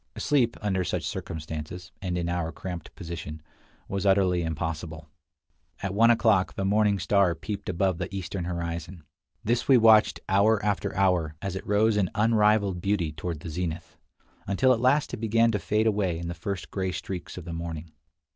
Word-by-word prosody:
Sleep, 125 -6 +1
under 95 -3 +1
such 85 - -2
circumstances, 80 +2 -6
and 90 -2 -2
in 85 -1 -1
our 85 -1 -1
cramped 90 -3 -7
position, 80 -4 -7 0.5
was 100 0 -3
utterly 95 -3 +3
impossible. 80 0 -4 0.8
At 95 -1 -2
one 115 +3 +5
o'clock 110 -5 +3
the 95 - -2
morning 105 0 +3
star 95 -1 +2
peeped 105 0 -5
above 95 0 0
the 90 +2 -4
eastern 95 -1 -4
horizon. 85 0 -4 0.4
This 120 +2 0
we 135 - +7
watched 110 -2 +5
hour 105 +3 +4
after 105 0 -1
hour, 90 -5 +2
as 95 +1 -4
it 95 - -6
rose 105 +1 +3
in 95 -4 +2
unrivaled 105 -4 +3
beauty 95 -5 0
toward 80 0 -5
the 85 - -6
zenith, 85 0 -4 0.5
until 130 +7 +3
at 115 - -2
last 135 +3 +2
it - - -2
began 115 +1 +2
to 105 - -1
fade 105 +1 +1
away 100 -6 +1
in 85 0 -5
the - - -3
first 90 +2 -5
gray 95 -2 -1
streaks 90 +1 -6
of 90 - -7
the 85 - -6
morning. 80 -1 -6
95 Hz, 175 wpm, -27 LUFS, 85-105 Hz, 0.8 s, we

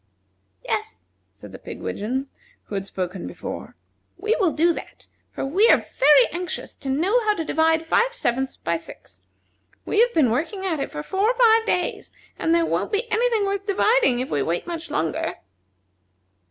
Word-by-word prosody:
"Yes," 90 - -3 0.3
said 105 -1 -12
the - - -10
pigwidgeon 245 - -4 0.4
who - - -11
had 195 -1 -3
spoken 180 -1 -4
before. - - -7 0.4
"We 425 +5 0
will 370 -6 +3
do 335 +3 +3
that, - - -10 0.2
for - - -4
we 380 +11 +4
are - - +7
very 280 -2 +4
anxious 355 +1 -5
to 275 - -6
know 375 - +2
how 425 -1 +3
to 325 - -3
divide 320 +1 +2
five 470 +9 +2
sevenths 265 - -2
by 170 0 -1
six. 165 - -11 0.6
We 420 - 0
have 480 +1 +5
been 275 -8 +4
working 340 - -2
at 330 -5 -1
it - - -3
for 150 - -5
four 390 - +1
or - - 0
five 455 -2 +5
days, 360 - -1 0.3
and 325 +1 +2
there 335 -1 +3
won't - - -1
be 445 +3 -1
any 470 +3 +2
thing 440 -4 +1
worth 395 +1 -2
dividing 415 - +3
if 255 +2 -3
we 145 - +1
wait 165 +5 -1
much 340 -1 -6
longer." 165 - -2
330 Hz, 180 wpm, -23 LUFS, 255-415 Hz, 0.6 s, are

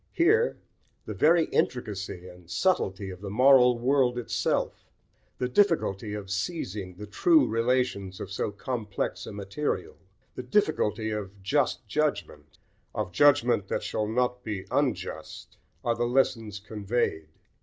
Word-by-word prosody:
Here 435 +8 +3 0.5
the - - -5
very 165 +1 +4
intricacy 100 -7 -2
and 90 -1 -14
subtlety 100 - 0
of 90 0 -10
the 100 - -5
moral 125 +2 +6
world 125 0 +2
itself, 120 - -2 0.5
the 125 - -1
difficulty 125 - +1
of 100 -2 -7
seizing 100 - -3
the 105 +3 -8
true 135 - +4
relations 115 -5 0
of - - -6
so 100 - -1
complex 105 -1 -4
a - - -6
material, 100 +8 -3 0.4
the - - -5
difficulty 120 - 0
of 100 -2 -6
just 140 +7 0
judgment, 150 - -2 0.4
of 90 - -2
judgment 125 -6 +4
that - - -2
shall 105 - -2
not 125 +2 0
be 105 -4 -4
unjust, - - -3 0.3
are 120 - +2
the 120 +1 -1
lessons 120 -4 +1
conveyed. 105 -6 -2
115 Hz, 135 wpm, -27 LUFS, 100-130 Hz, 0.5 s, moral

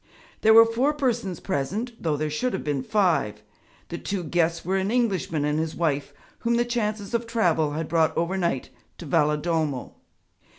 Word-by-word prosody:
There 220 0 +6
were 225 0 +10
four 245 +6 +1
persons 240 -10 -1
present, 195 - -2
though 155 -3 0
there 155 +1 -2
should 250 +12 -1
have - - -3
been 145 -3 -1
five. 155 - +1 0.5
The 170 - -5
two 195 -3 -3
guests 165 0 0
were 190 +2 +1
an 190 +1 0
Englishman 190 - 0
and 150 +1 0
his 160 0 -2
wife, 145 -4 -1 0.3
whom 235 0 +1
the 240 0 +2
chances 215 -3 -2
of 235 0 -1
travel 170 -10 +1
had 160 +1 -3
brought 160 -2 +1
over 170 +3 0
night 170 -8 -1 0.3
to - - -9
Valedolmo. 150 -2 0
175 Hz, 175 wpm, -25 LUFS, 150-220 Hz, 0.5 s, were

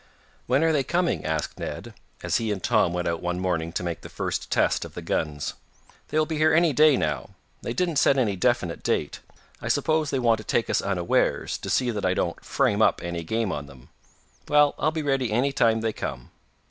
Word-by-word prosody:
"When 130 +5 +3
are 165 - +3
they 145 -3 +2
coming?" 175 +4 0
asked 80 -1 -3
Ned, - - -6 0.3
as - - +1
he 115 -2 -2
and 95 -3 -4
Tom 110 -7 +3
went 90 0 -2
out 85 -1 -2
one 90 0 -2
morning 85 -3 -1
to 90 - -2
make 85 -2 -4
the - - -10
first - - -3
test - - +2
of - - -10
the - - -5
guns. 75 -2 -2 0.5
"They - - -2
will 155 - +3
be 155 -1 -3
here 155 0 +4
any 170 -2 +4
day, 150 0 +5
now. 75 -2 -3 0.3
They 115 - -4
didn't 170 +1 0
set 140 -1 +4
any 110 -7 +1
definite 95 -5 0
date. - - -1 0.4
I - - -5
suppose 155 -1 +1
they 135 - 0
want 115 -3 +2
to - - -8
take 115 - 0
us - - +2
unawares, 90 -3 0
to - - -6
see 125 -2 +1
that 105 -3 -4
I 95 0 +1
don't 85 - -2
'frame 120 -3 +1
up' - - +3
any 85 -1 -3
game 110 +4 -1
on 75 -3 -5
them. 65 -2 -16 0.6
Well, 150 -1 +4
I'll 155 - +2
be 155 0 -3
ready 135 -5 0
any 125 +6 +2
time 115 -4 +2
they 110 -1 -1
come. - - -6
115 Hz, 225 wpm, -25 LUFS, 85-140 Hz, 0.6 s, day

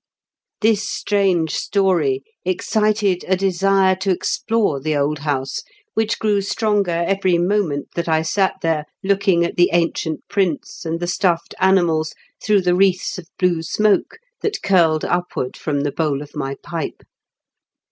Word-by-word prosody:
This 215 -1 +3
steange 190 -8 0
story 170 -11 +1 0.2
excited 205 +1 +1
a 190 - +3
desire 195 0 +2
to 190 +1 -2
explore 195 -2 0
the 155 +1 0
old 145 +1 0
house 140 -2 -2 0.3
which 220 0 0
grew 210 -2 +1
stronger 200 -4 0
every 190 -2 +2
moment 175 -5 0
that 170 -1 -2
I 160 0 +2
sat 190 +4 +1
there, 160 -2 0 0.2
looking 195 -3 +2
at - - -5
the 175 0 +5
ancient 165 -2 -1
prints 180 -4 -2
and 165 +1 -2
the 175 - -2
stuffed 175 -1 0
animals 175 -5 +2 0.3
through 205 -2 +3
the 180 -1 +2
wreaths 185 +2 +1
of 170 - -12
blue 180 -3 +1
smoke 210 +5 +1 0.2
that 425 -1 -2
curled 165 -5 +3
upward 175 -7 -2
from 145 -2 -2
the 145 0 -1
bowl 145 -3 -1
of 145 - -15
my 135 -2 -3
pipe. 165 -4 -5
180 Hz, 145 wpm, -20 LUFS, 160-195 Hz, 0.3 s, the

